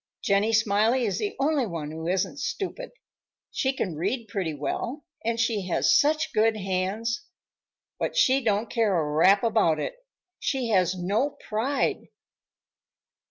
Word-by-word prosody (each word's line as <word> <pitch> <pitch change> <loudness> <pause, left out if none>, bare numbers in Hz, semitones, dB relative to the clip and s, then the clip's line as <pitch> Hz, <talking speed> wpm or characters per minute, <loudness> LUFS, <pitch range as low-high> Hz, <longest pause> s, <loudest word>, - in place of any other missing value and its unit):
"Jenny 200 +2 +2
Smiley 220 +3 +2
is 200 - -1
the 410 -1 -2
only 280 -3 +1
one 160 -5 -5
who 160 +1 -6
isn't 185 +1 -1
stupid. - - -4 0.6
She 265 - 0
can 205 -9 -3
read 210 - -2
pretty 185 -8 -2
well, 235 - -4 0.2
and 230 0 -1
she 225 -5 0
has 185 - +3
such 310 0 +2
good 220 0 +3
hands. 205 - -2 0.7
But - - -2
she 270 - +4
don't 215 0 +1
care 220 -6 +1
a 150 -2 -1
rap 190 +8 +5
about 215 -9 +2
it. - - -3 0.5
She 260 -4 -1
has 185 -3 +2
no 205 +11 -1
pride." 255 +6 -1
220 Hz, 145 wpm, -26 LUFS, 185-255 Hz, 0.7 s, rap